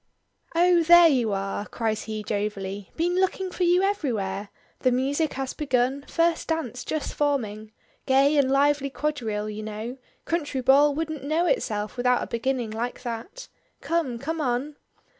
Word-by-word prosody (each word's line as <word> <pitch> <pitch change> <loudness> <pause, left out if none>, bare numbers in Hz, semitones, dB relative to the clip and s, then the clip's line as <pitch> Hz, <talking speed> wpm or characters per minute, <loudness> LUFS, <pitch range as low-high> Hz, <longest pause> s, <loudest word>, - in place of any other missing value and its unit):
"Oh, 350 0 +5
there 345 +1 +8
you 245 -7 +1
are," 195 +1 -3
cries 220 -2 -2
he 215 -1 -4
jovially. 200 -2 -3
"Been 350 +2 0
looking 380 0 0
for 365 - -8
you 355 +2 +4
everywhere. 215 - -1 0.3
The 255 - +2
music 280 +5 0
has 265 -1 -3
begun; 270 -1 0
first 335 0 +1
dance 310 -7 -2
just 310 -2 -3
forming. 220 -8 -1 0.4
Gay 275 +3 +4
and 275 -2 +3
lively 280 +1 +2
quadrille, 235 -8 -2
you 210 +1 -6
know 215 +4 -6 0.3
country 295 -5 -1
ball 280 +3 +5
wouldn't 315 -3 -3
know 315 +5 +1
itself 215 - -1
without 250 0 +2
a - - -3
beginning 240 -1 -2
like 235 +3 -4
that. 240 - -6 0.3
Come; 320 -8 -1
come 315 +6 -3
on." 265 +2 -1
265 Hz, 155 wpm, -25 LUFS, 225-315 Hz, 0.4 s, there